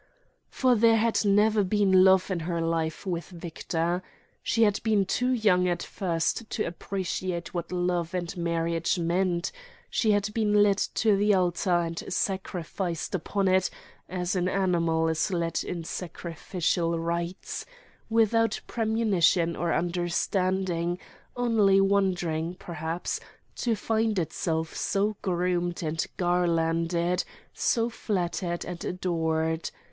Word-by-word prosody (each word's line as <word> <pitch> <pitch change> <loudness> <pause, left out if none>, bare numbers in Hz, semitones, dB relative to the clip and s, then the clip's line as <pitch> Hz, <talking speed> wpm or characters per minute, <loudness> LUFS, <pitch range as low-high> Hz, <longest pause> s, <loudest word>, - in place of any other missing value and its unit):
For 255 -2 +2
there 230 0 +5
had 225 0 +2
never 210 +1 +4
been 190 -1 +4
love 190 0 +5
in 180 - 0
her 170 +1 -2
life 165 +1 -1
with 175 -3 -3
Victor. 170 0 -2 0.4
She 230 - +2
had 205 -2 +2
been 215 -3 +2
too 250 +6 0
young 200 -7 +3
at 175 -1 -1
first 185 +4 -2
to 215 - -1
appreciate 180 0 -4
what 175 -1 -4
love 175 -1 -1
and 175 0 -3
marriage 170 0 0
meant, 175 +1 0 0.4
she 220 - +1
had 205 0 +2
been 210 -2 +3
led 200 -1 +3 0.2
to 215 -2 +3
the 205 +1 +3
altar 175 -1 +2
and 165 0 -4
sacrificed 180 -3 -2
upon 195 +2 0
it 185 0 +3 0.4
as 180 +1 -2
an 180 -1 +1
animal 170 -4 +1
is 160 -1 0
led 170 -3 -1
in 170 -2 -4
sacrificial 170 0 -2
rites—without 225 - -1
premonition 200 -7 +2
or 170 +1 -1
understanding, 175 +1 0 0.4
only 220 -5 +4
wondering 180 -4 +1
(perhaps) 170 -1 -4 0.4
to 235 -2 +1
find 220 0 0
itself 160 -1 -2
so 205 +2 0
groomed 175 -1 -1
and 160 +1 -1
garlanded, 170 0 +1 0.3
so 230 -1 +1
flattered 180 -6 -2
and 175 -1 -6
adored. 160 -2 -1
180 Hz, 120 wpm, -27 LUFS, 170-200 Hz, 0.4 s, there